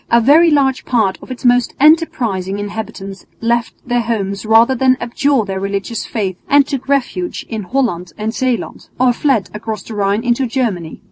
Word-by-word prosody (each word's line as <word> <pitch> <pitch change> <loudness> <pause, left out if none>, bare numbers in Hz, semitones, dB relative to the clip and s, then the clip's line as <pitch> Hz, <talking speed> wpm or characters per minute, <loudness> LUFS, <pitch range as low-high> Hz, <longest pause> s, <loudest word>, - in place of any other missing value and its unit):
A 235 - +5
very 300 +8 +5
large 275 -4 +2
part 220 -6 0
of - - -13
its 255 0 -7
most 245 0 +3
enterprising 235 - +2
inhabitants 205 -2 -7
left 235 0 0
their 245 0 +1
homes 210 -3 -3
rather 225 +3 +5
than 260 0 +2
abjure 240 0 0
their 190 -1 -4
religious 200 +3 -3
faith 195 -5 -3
and 285 -1 +5
took 275 -2 -5
refuge 280 +6 -1
in 220 -2 -4
Holland 185 -6 -2
and 215 +1 -3
Zeeland, 255 -2 -3
or 250 -1 +4
fled 240 -7 0
across 210 -1 -5
the 225 - -9
Rhine 205 +1 0
into 245 +1 +1
Germany. 220 -10 -2
235 Hz, 175 wpm, -16 LUFS, 200-260 Hz, -, A